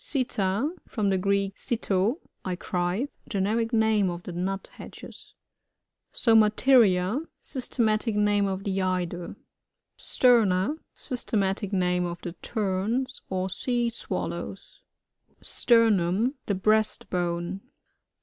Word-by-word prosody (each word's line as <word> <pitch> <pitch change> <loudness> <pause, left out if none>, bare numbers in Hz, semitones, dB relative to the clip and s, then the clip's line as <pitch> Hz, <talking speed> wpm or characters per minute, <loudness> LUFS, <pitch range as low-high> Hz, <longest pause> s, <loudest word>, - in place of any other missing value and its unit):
SiTTA. 240 -1 0
— - - -41
From 205 -4 +1
the 190 - +1
Greek, 200 +1 0
sitt^, 215 -1 0 0.3
I 185 -1 -2
cry. 180 +7 -1 0.2
Generic 220 +3 0
name 220 -4 +3
of 175 0 -6
the - - -6
Nuthatches. 190 +3 -7 0.8
SoMATERiA.— 220 -2 +4 0.2
Systematic 225 -4 0
name 205 -1 +2
of 190 0 -3
the 195 -1 -1
Eider. 180 -1 -2 0.6
STBRNA. 230 +1 +3 0.2
^y8tematic 205 -6 -1
name 180 -2 +1
of 175 0 -6
the 175 - -5
Teras 220 +5 -2
or 185 0 -1
Sea 240 +2 0
SwaHows. 230 - -5 0.6
Sternum.— 225 -1 +3
The 200 - +1
breast 215 +3 +1
bone. 175 +1 -2
200 Hz, 105 wpm, -26 LUFS, 185-230 Hz, 0.8 s, SoMATERiA